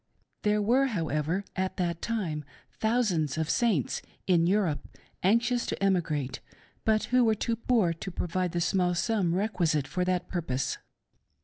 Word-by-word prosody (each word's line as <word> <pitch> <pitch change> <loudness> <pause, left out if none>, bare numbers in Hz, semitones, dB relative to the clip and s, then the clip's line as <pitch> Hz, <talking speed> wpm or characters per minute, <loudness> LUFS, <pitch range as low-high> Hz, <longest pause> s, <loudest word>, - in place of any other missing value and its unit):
There 210 0 +2
were, 255 +6 +3
however, 165 - -1
at 190 0 -2
that 170 -2 -1
time 180 -10 -2 0.3
thousands 200 - 0
of 160 -1 0
Saints 220 - +1 0.2
in 170 -3 +3
Europe 185 -6 +2 0.4
anxious 235 +5 +2
to - - -2
emigrate, 155 -9 0 0.4
but 215 -1 +2
who 250 -1 +6
were 220 -2 +3
too 230 +2 -1
poor 225 -7 +2
to 165 +4 -6
provide 180 0 -2
the 175 - 0
small 180 0 +2
sum 185 -3 +1
requisite 175 -8 +1
for 180 - -1
that 180 -1 0
purpose. 140 -7 -2
185 Hz, 145 wpm, -28 LUFS, 165-220 Hz, 0.4 s, who